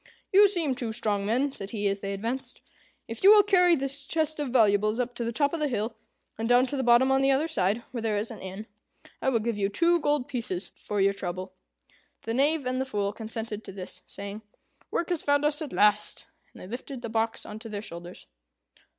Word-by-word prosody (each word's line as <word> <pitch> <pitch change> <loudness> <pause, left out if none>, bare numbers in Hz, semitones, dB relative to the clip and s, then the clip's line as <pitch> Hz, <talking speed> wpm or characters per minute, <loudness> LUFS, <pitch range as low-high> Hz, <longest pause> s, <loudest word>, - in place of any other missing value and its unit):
"You 405 +2 +8
seem 340 -8 0
two 240 -3 -3
strong 205 -3 -1
men," 260 +6 +1
said 195 -7 -7
he, 205 -2 -1
as 200 0 -1
they 195 - -3
advanced; 230 +7 -4 0.5
"if 230 +7 -6
you 390 - +9
will 420 0 +9
carry 360 -4 +5
this 275 0 -1
chest 315 -1 0
of 295 - -1
valuables 215 -2 +3
up 250 0 -1
to 240 - -4
the 230 - -2
top 285 +5 +1
of 335 - -2
the 300 - +1
hill, 225 -3 -2 0.4
and 225 +1 -1
down 245 +1 +6
to 285 - -4
the 270 - 0
bottom 245 +2 +5
on 270 0 +3
the 270 - +3
other 275 +4 +2
side, 220 - 0
where 240 -2 -4
there 220 -2 0
is 215 +4 -2
an 225 - -9
inn, 190 +3 -7 0.6
I - - +2
will 250 - +2
give 225 -1 -2
you 195 0 +1
two 340 +10 +3
gold 290 -4 0
pieces 210 -8 -3
for 210 - -4
your 195 +1 +4
trouble." 185 -1 -5 0.7
The 225 - -3
Knave 285 +3 +2
and 255 +1 -1
the - - -1
Fool 205 -5 -2
consented 220 -1 -5
to - - -8
this, 185 -1 -8
saying, 200 +2 -7 0.5
"Work 340 - -2
has 350 -3 0
found 285 0 +2
us 300 +1 0
at 300 - -5
last;" 210 0 +2 0.3
and - - -15
they - - -9
lifted 250 +3 -7
the - - -3
box 225 0 -1
on 215 - -8
to 225 0 -9
their 205 -1 -5
shoulders. 175 -1 -9
235 Hz, 230 wpm, -27 LUFS, 205-280 Hz, 0.7 s, you